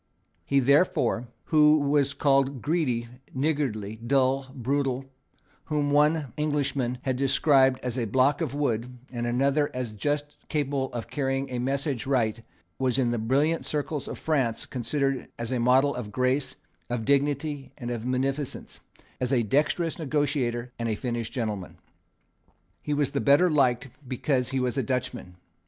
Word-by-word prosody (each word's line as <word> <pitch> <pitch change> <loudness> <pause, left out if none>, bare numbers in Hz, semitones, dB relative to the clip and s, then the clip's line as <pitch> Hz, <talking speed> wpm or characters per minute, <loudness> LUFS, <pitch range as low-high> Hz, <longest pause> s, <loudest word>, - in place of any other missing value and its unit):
He, 140 - +3
therefore, 130 -4 +2 0.3
who 150 0 +7
here 145 - -1
was 140 -1 +2
called 140 -2 +2
greedy, 140 -8 0 0.3
niggardly, 130 -8 -1
dull, 130 +3 +1
brutal, 135 +1 -1 0.6
whom 150 -2 0
one 150 -2 +3
English 145 -2 0
nobleman 125 -2 -1
had 130 -2 -1
described 135 -1 +4
as 125 0 -2
a 120 - 0
block 130 +7 +2
of 145 -4 -2
wood, 125 -3 -1
and 120 -1 -3
another 140 +4 +2
as 125 -4 -3
just 145 +7 -2
capable 140 -3 -1
of 120 -2 -5
carrying 135 -1 -2
a 125 - -2
message 135 0 -1
right, 115 -4 +1 0.4
was 130 -2 +1
in 125 -3 +2
the 120 - -1
brilliant 140 +9 +1
circles 150 -1 -3
of - - -5
France 130 -8 0
considered 135 +1 -2
as 115 +1 -4
a 125 - 0
model 130 +4 +4
of 110 -4 -6
grace, 130 +2 0 0.3
of 120 -2 -2
dignity 140 0 0
and 120 -3 -5
of 115 -2 -3
munificence, 135 +2 -2 0.4
as 125 0 -1
a 125 -3 +3
dexterous 155 - +1
negotiator 135 -5 -1
and 115 -1 -1
a 110 - 0
finished 120 0 -3
gentleman. 105 -7 -4 1.0
He 150 - -1
was 145 -2 +1
the - - -1
better 150 +5 +5
liked 130 -3 +2 0.2
because 130 0 0
he 135 0 -1
was 125 +2 0
a - - +3
Dutchman. 125 -6 -3
135 Hz, 155 wpm, -27 LUFS, 125-145 Hz, 1.0 s, who